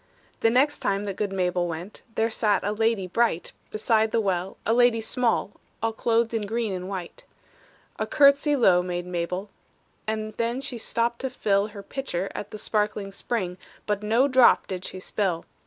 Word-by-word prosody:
The 225 - +4
next 275 +5 +3
time 200 +1 0
that 200 -2 -4
good 205 0 -2
Mabel 180 -2 0
went, 170 +4 -7
There 225 +1 +1
sat 215 -2 +1
a 205 - 0
lady 220 -2 +1
bright 185 -2 0 0.2
Beside 220 0 +1
the 230 - +2
well, 190 -3 -1
a 225 - +3
lady 245 -1 +4
small, 225 -2 0 0.3
All 225 0 +1
clothed 230 +1 +1
in 215 -3 -1
green 225 -1 -1
and 185 0 -5
white. 185 -3 -6 0.8
A - - -1
courtesy 280 +1 +5
low 190 -9 +5
made 175 0 -3
Mabel, 180 +3 -3 0.6
And 215 0 -2
then 235 +2 0
she 255 -3 -5
stooped 235 +1 0
to 265 - -2
fill 205 -5 +1
Her 205 -2 -10
pitcher 195 -6 -3
at 205 - -6
the - - -7
sparkling 210 -1 -1
spring, 190 -3 -3 0.3
But 210 -1 -1
no 225 +6 +3
drop 255 -3 +5
did 185 -1 -5
she 185 - -5
spill. 185 -3 -1
215 Hz, 180 wpm, -26 LUFS, 190-230 Hz, 0.8 s, courtesy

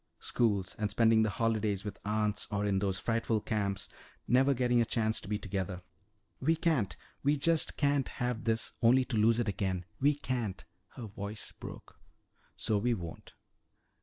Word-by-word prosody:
Schools, 100 -6 0
and 105 -1 0
spending 110 +2 +4
the 110 - +2
holidays 110 -3 0
with 105 - -6
aunts 105 0 0
or 105 0 -1
in 100 -2 +2
those 95 -1 0
frightful 115 +1 0
camps, 100 -4 -1 0.4
never 135 +3 +4
getting 120 -1 +3
a - - +5
chance 110 -1 0
to - - -10
be 105 0 0
together. 95 -2 -4 0.6
We 160 +5 +2
can't 135 - +1 0.3
we 145 +1 +2
just 165 +2 +2
can't 140 -2 +2
have 125 0 -3
this 115 0 0
only 125 +3 +5
to 120 - -3
lose 115 +2 +4
it 120 - 0
again. 95 -2 -1
We 145 +2 +4
can't!" 125 -8 -3 0.3
her 120 - -6
voice 100 0 -6
broke. - - -11 0.6
"So 105 -2 +1
we 120 +3 +1
won't." 85 -5 -8
110 Hz, 165 wpm, -32 LUFS, 100-125 Hz, 0.6 s, a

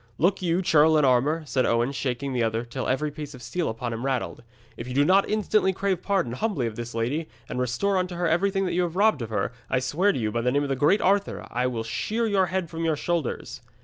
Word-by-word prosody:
Look 185 +4 +2
you, 175 +1 +1
churl 160 -1 +5
in 150 - +4
armour,' 135 +6 +2
said 130 -3 0
Owen, 115 +3 +1
shaking 135 0 -3
the 125 - 0
other 115 +1 0
till 125 +2 -4
every 150 +3 0
piece 150 -1 -8
of 125 - -12
steel 175 -2 -2
upon 115 +1 -4
him 115 +2 -5
rattled, 135 -2 -2 0.3
'if 115 - -7
you 125 - -5
do 145 +1 +4
not 190 +4 +4
instantly 210 -2 +2
crave 190 -1 -1
pardon 190 - 0
humbly 160 - -1
of 115 -2 -4
this 120 0 -6
lady, 135 +8 -1 0.2
and - - -4
restore 125 +11 0
unto 180 -1 -3
her 175 0 0
everything 195 +4 +1
you 180 0 0
have 175 -1 -2
robbed 210 - +3
of 115 - -4
her, 110 - -1 0.2
I 130 - +1
swear 150 +11 +2
to - - -3
you, 110 -3 -1
by 115 +2 -1
the 125 +1 +1
name 145 +2 +1
of 140 - -3
the 135 - +1
great 150 +10 +3
Arthur, 200 +1 +1
I 125 +1 0
will 115 -3 -3
shear 220 - -2
your 195 -4 +2
head 185 -1 -2
from 165 +1 -5
your 160 -1 +1
shoulders.' 160 -5 -3
150 Hz, 250 wpm, -25 LUFS, 125-185 Hz, 0.3 s, churl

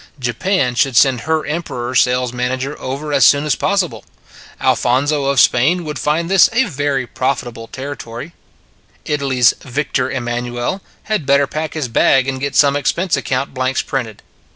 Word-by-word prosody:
Japan 125 - 0
should 130 +1 +1
send 125 +1 +4
her 160 -1 +1
Emperor 130 -6 -4
sales 125 0 +2
manager 130 +3 -2
over 140 +3 -4
as 140 - +4
soon 145 +1 +5
as 150 - +2
possible. 195 -4 -1 0.6
Alphonso 140 +4 +1
of 140 -1 +2
Spain 160 +11 +3
would 150 -3 -5
find 155 +3 0
this 190 -1 +5
a 240 +3 +3
very 145 - -2
profitable 120 -3 -3
territory. 135 +2 -7 0.7
Italy 140 -3 -1
s 120 -2 +5
Victor 135 0 -2
Em 125 -3 -4
nanuel 120 +8 -3 0.2
had 215 -10 -2
better 140 0 +4
pack 155 +3 -5
his 150 -5 -2
bag 130 +3 +3
and 130 -1 -3
get 140 0 -3
some 140 -1 +4
expense 170 +4 0
account 135 0 -2
blanks 130 0 -1
printed. 120 -6 -4
135 Hz, 160 wpm, -17 LUFS, 125-150 Hz, 0.7 s, soon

